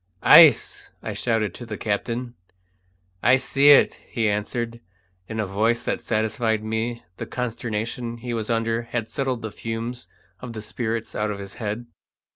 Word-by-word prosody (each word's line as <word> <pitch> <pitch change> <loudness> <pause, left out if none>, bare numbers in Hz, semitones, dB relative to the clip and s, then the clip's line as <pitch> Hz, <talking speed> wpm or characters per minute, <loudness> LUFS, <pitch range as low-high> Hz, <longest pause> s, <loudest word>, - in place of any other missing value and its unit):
"Ice!" - - +7
I - - -4
shouted 115 -5 0
to - - -9
the 105 -2 -5
captain. 115 +4 -2 0.9
"I 130 +2 +5
see 140 +2 +4
it!" 145 - +6
he 115 -3 0
answered, 115 +3 -2 0.5
in 110 0 -5
a 110 - +1
voice 110 +5 +1
that - - -2
satisfied 110 0 0
me 110 +2 -2
the - - -5
consternation 120 0 -3
he 120 +1 -5
was 110 -1 -3
under 115 0 0
had 115 -1 -4
settled 130 -5 -2
the 110 - -4
fumes 115 +3 -5 0.3
of 125 -2 -8
the 110 -2 -6
spirits 115 +1 -3
out 105 0 -1
of 105 - -3
his 100 0 -8
head. 110 +2 -3
115 Hz, 160 wpm, -24 LUFS, 110-120 Hz, 0.9 s, Ice